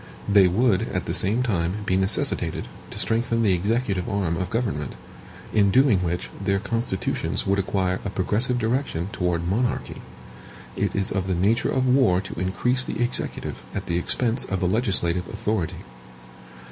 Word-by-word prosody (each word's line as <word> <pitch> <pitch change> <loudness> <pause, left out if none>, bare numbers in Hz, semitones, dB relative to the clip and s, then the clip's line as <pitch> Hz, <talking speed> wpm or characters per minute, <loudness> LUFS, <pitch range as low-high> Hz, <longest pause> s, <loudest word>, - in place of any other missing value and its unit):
They 100 -2 +6
would, 110 +2 +2
at 90 - -2
the 85 - -2
same 100 +8 +2
time, 95 -2 -1
be 95 - +1
necessitated 95 +1 +1 0.2
to - - -8
strengthen 115 0 +1
the 100 -4 +4
executive 100 0 0
arm 95 -4 0
of 90 +1 -3
government, 95 - -2 0.6
in 100 -2 +4
doing 125 -2 +4
which 90 -1 -3
their 100 0 +2
constitutions 115 -1 -2
would 100 +1 +1
acquire 95 -1 0
a 100 - -3
progressive 105 +6 0
direction 115 -7 -1
toward 85 -3 -1
monarchy. 120 +7 -1 0.7
It - - -1
is 100 -1 0
of 95 -1 -1
the 95 - 0
nature 105 +7 +2
of 130 -1 +1
war 125 -8 +4
to 95 - -7
increase 125 +8 0
the - - -5
executive 120 0 -1
at - - -3
the 85 0 0
expense 120 +6 +1
of 95 - -3
the 90 - +1
legislative 90 -5 +1
authority. 105 -5 -3
100 Hz, 160 wpm, -24 LUFS, 90-115 Hz, 0.7 s, They